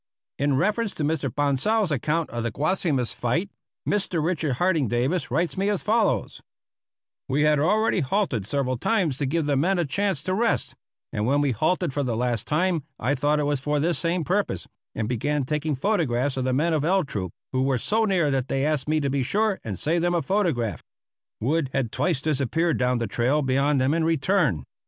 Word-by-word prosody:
In 140 0 +2
reference 210 - 0
to 155 - -3
Mr. 150 -2 0
Bonsal's 145 - +1
account 150 +4 -1
of 120 - -3
the 115 - -1
Guasimas 145 - 0
fight, 165 +12 -1 0.4
Mr. 195 -4 0
Richard 160 -4 0
Harding 165 -1 +1
Davis 130 - 0
writes 165 +7 0
me 195 +1 0
as 205 -3 -1
follows: 215 - +1 0.9
We 140 +3 +2
had 150 -1 +3
already 210 +7 +2
halted 140 - 0
several 130 -2 -1
times 180 - +1
to 140 - -1
give 160 +3 0
the 145 -1 +1
men 180 +8 +2
a 175 - +1
chance 180 +1 -1
to 185 - -1
rest, 225 +4 0 0.4
and 105 +1 -1
when 140 +3 +3
we 145 -2 +2
halted 155 - 0
for 145 - -1
the 120 -5 -1
last 120 -2 -1
time 170 +2 +1 0.2
I 130 +5 0
thought 145 +2 +1
it - - +1
was 145 -1 0
for 150 +2 -1
this 170 +3 +1
same 170 0 0
purpose, 180 - -1 0.3
and 110 -1 -2
began 140 +5 -1
taking 150 +1 -1
photographs 140 - 0
of 130 -1 -2
the 130 - +1
men 160 +5 +1
of 155 -2 +1
L 190 +4 +2
Troop, 100 - -4 0.2
who 130 - 0
were 135 -1 +2
so 220 - +1
near 175 -8 +2
that 135 -1 0
they 135 +1 0
asked 150 -2 0
me 155 0 +2
to 140 - 0
be 140 0 0
sure 205 - 0
and 100 -5 -4
save 165 - 0
them 175 +1 +1
a 170 - 0
photograph. 155 - 0 0.6
Wood 140 +4 0
had 130 -5 -1
twice 160 -7 0
disappeared 155 +3 0
down 125 0 +2
the 120 - -1
trail 125 +8 +1
beyond 135 +2 +2
them 130 +3 +2
and 165 0 +1
returned. 160 - +1
150 Hz, 205 wpm, -25 LUFS, 130-175 Hz, 0.9 s, had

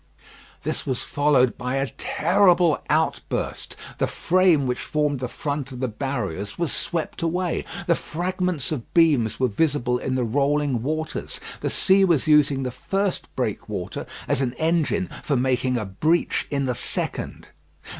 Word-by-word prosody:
This - - -2
was 130 -2 -1
followed 145 -4 +2
by 125 +1 -2
a 135 0 -1
terrible 175 0 +3
outburst. 160 +1 -1 0.2
The - - +2
frame 175 -5 +3
which 125 -1 -1
formed 150 -3 0
the 125 - -2
front 140 +1 -4
of 125 - -7
the 130 - 0
barriers 105 - -4
was 170 -3 0
swept 170 +1 -2
away. 175 +1 -1 0.2
The 170 - +4
fragments 180 -2 -2
of 135 -7 -4
beams 145 -10 +4
were 130 - +3
visible 125 0 +1
in 130 +1 -2
the 130 - +1
rolling 140 +1 +1
waters. 155 +4 -3 0.2
The - - -1
sea 195 0 +4
was 170 -6 +2
using 145 -3 +4
the 125 - -2
first 195 +7 -2
breakwater - - -3 0.2
as - - +1
an 125 -2 0
engine 170 +6 +1
for 150 - 0
making 125 0 +1
a 110 - -2
breach 155 - +1
in 140 -1 0
the 125 - 0
second. - - -4
145 Hz, 155 wpm, -24 LUFS, 125-170 Hz, 0.2 s, The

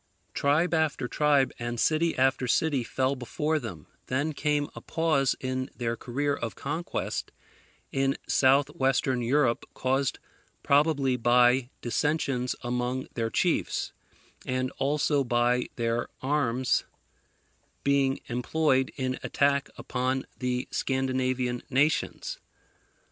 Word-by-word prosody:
Tribe 155 +5 +2
after 155 -5 +1
tribe, 145 -1 +2
and 120 0 -3
city 160 +4 +2
after 130 -1 +2
city, 140 +1 +2
fell 130 +3 0
before 150 +5 -1
them. 95 - -7 0.2
Then 140 +5 0
came 145 0 0
a - - -9
pause 155 -5 +1
in 130 0 -3
their 115 -2 -1
career 140 +5 -1
of 115 -5 -5
conquest 160 +5 -3 0.6
in 135 0 +1
South 135 +1 +4
western 130 -1 +1
Europe 120 0 +2
caused 130 +1 0 0.5
probably 140 -3 +3
by 125 +1 +4
dissensions 125 -1 0
among 125 +3 -2
their 115 -1 -1
chiefs, - - 0 0.5
and 130 0 -1
also 145 0 +2
by 120 0 +1
their 115 0 -1
arms 130 -3 +1 1.0
being 140 -1 +2
employed 130 +2 +1
in 130 -1 -2
attack 140 -1 +1
upon 130 +1 -1
the 125 0 -1
Scandinavian 130 -2 0
nations. 145 +4 0
130 Hz, 110 wpm, -28 LUFS, 125-145 Hz, 1.0 s, South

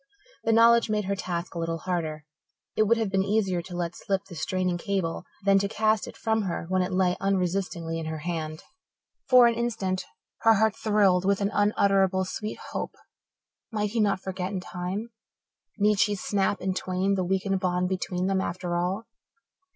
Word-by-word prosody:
The 225 - +2
knowledge 230 0 +5
made 210 -1 0
her 200 +1 0
task 180 -2 -4
a 170 - -4
little 165 0 -2
harder. 160 -3 -3 0.5
It 215 - +3
would 230 +2 +4
have 220 -4 -1
been 195 -1 +2
easier 195 -3 +1
to 175 +1 -9
let 175 0 -2
slip 195 0 -2
the 190 - -12
straining 180 +1 -1
cable 185 -3 -2 0.2
than 195 0 +5
to 200 - 0
cast 215 0 +1
it - - -10
from 220 -1 +1
her 180 -4 -3
when 185 0 +2
it 180 +1 -1
lay 185 -1 +2
unresistingly 180 -3 -1
in 160 - -5
her 160 0 -3
hand. 155 -1 -4 0.7
For 250 -2 +8
an 235 - +4
instant 225 -6 -2 0.3
her 225 0 +5
heart 220 +1 +2
thrilled 200 -4 +3
with 195 0 +2
an 200 0 0
unutterably 195 -2 +3
sweet 210 +3 -5
hope. - - -4 0.8
Might 210 -2 -1
he 230 - -1
not 205 -3 +2
forget 190 -1 -4
in 195 - -2
time? 185 +5 -5 0.7
Need 210 -1 +3
she 210 -1 +3
snap 200 0 0
in 190 0 0
twain 185 +1 0
the 190 -1 0
weakened 190 +1 0
bond 180 -1 0
between 180 -1 -2
them 190 0 +1
after 175 -1 -3
all? 185 +6 -1
190 Hz, 185 wpm, -27 LUFS, 180-210 Hz, 0.8 s, For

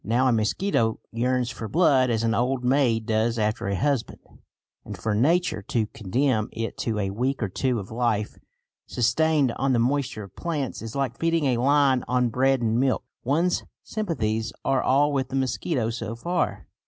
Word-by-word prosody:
Now 120 +5 +2
a - - +4
mosquito 115 - +1
yearns 125 +1 0
for 115 -1 -6
blood 135 -4 +3
as 115 -1 0
an 115 0 +1
old 125 +2 0
maid 125 -4 +2
does 115 +1 +1
after 105 0 -1
a 100 - 0
husband, 140 +4 -1 0.7
and - - -8
for 110 - -2
Nature 155 - +2
to 110 +3 -1
condemn 110 +3 -1
it 115 0 -4
to 110 -2 -1
a 100 -2 -1
week 125 +5 -1
or - - 0
two 125 +5 0
of 100 -1 -6
life 110 -3 -1 0.5
sustained 145 +3 +2
on 135 -1 +1
the - - +3
moisture 130 -2 0
of 100 -2 -13
plants 150 -7 -3
is 115 -1 -7
like 135 -4 -2
feeding 165 -2 +1
a 125 -3 +2
lion 135 0 +3
on 125 -1 +2
bread 130 +2 +2
and 115 0 +1
milk. 130 0 +1 0.2
One's 165 +8 +1 0.2
sympathies 115 - -2
are 135 - +2
all 145 +2 +3
with 130 -2 -1
the 135 - -4
mosquito 130 -1 -1
so 115 -1 -5
far. 175 +9 -2
125 Hz, 180 wpm, -25 LUFS, 115-135 Hz, 0.7 s, a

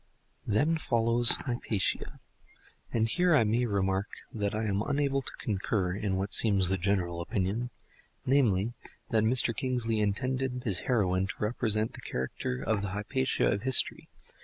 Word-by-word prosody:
Then 150 +10 +2
follows 115 -4 +3
Hypatia. 120 -6 -1 0.7
And 115 -1 +1
here 175 +7 +2
I 125 - +5
may 115 +3 +1
remark 95 -1 0 0.3
that 105 -2 -2
I 110 - -1
am 100 -2 0
unable 140 +2 0
to - - -3
concur 95 -3 -1
in 100 -1 -2
what 95 +2 -3
seems 100 -5 +5
the 95 0 0
general 90 -2 -1
opinion—namely, 110 +3 -2 0.4
that 110 -2 +3
Mr. 115 0 +2
Kingsley 120 -3 -1
intended 125 +4 -1
his 95 -6 0
heroine 95 -6 +1
to - - -6
represent 110 0 -1
the - - -9
character 65 -1 -4
of 110 +3 0
the 100 - -3
Hypatia 130 +6 0
of 100 - -1
history. 130 +2 +2
110 Hz, 145 wpm, -29 LUFS, 100-125 Hz, 0.7 s, I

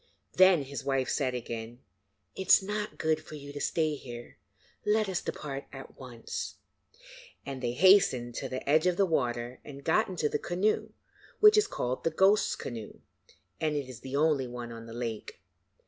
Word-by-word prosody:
Then 185 -5 +6
his 135 -2 -6
wife 135 -2 0
said 130 -4 0
again: 115 -1 -6 0.6
'It 190 - -5
is - - +7
not 210 +1 -4
good 155 0 0
for 155 - -10
you 145 -1 -9
to 145 - -6
stay 155 0 +1
here. 120 -4 -9 0.5
Let 215 0 +2
us 190 -2 -1
depart 140 -2 -5
at 135 0 -10
once,' 125 -3 -6 0.9
and 135 -2 -6
they 120 -1 -1
hastened 135 -7 +5
to - - -4
the 130 +1 -5
edge 155 +4 +4
of 180 -1 +1
the 195 - +4
water 120 -6 -1
and 140 -1 -10
got 215 +9 +2
into 175 -5 -1
the - - -1
canoe, 185 +5 0 0.5
which 425 0 +8
is 425 -1 +4
called 125 - -3
the - - +2
Ghost's 190 +6 +3
Canoe, 115 -4 -7 0.6
and 155 -1 0
is 130 -4 -6
the 130 +1 -6
only 145 -3 +2
one 120 -1 -7
on 115 0 -9
the 115 - -9
lake. 115 -2 -5
140 Hz, 180 wpm, -29 LUFS, 125-175 Hz, 0.9 s, which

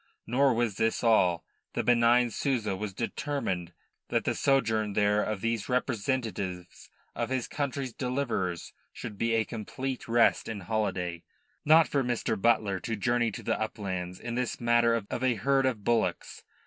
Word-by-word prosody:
Nor 130 +1 +3
was 115 -4 0
this 115 +1 0
all. 90 -7 +3 0.3
The - - -1
benign 120 0 +4
Souza 115 -6 -1
was 105 +1 -4
determined 115 - -3 0.4
that - - +1
the - - 0
sojourn 110 -6 +1
there 105 +1 +3
of 105 -2 -2
these 115 -2 -1
representatives 115 -7 -2 0.2
of - - -3
his 130 -2 -1
country's 140 -3 -3
deliverers 120 - -2 0.2
should 110 -3 -7
be 115 +3 0
a 110 -1 +2
complete 130 +4 -5
rest 115 0 +3
and 105 -4 -5
holiday. 90 -5 -2 0.4
Not 160 +2 +6
for 140 -2 0
Mr. 120 -2 -1
Butler 105 -2 +2
to 115 +5 -3
journey 120 +3 +1
to 105 - -8
the - - -1
uplands 95 -4 -4
in 120 - -5
this 125 0 -2
matter 120 0 +3
of 115 +2 -3
a 130 -2 +3
herd 135 +5 +2
of 115 -6 -2
bullocks. 110 -7 -1
115 Hz, 160 wpm, -29 LUFS, 100-125 Hz, 0.4 s, Not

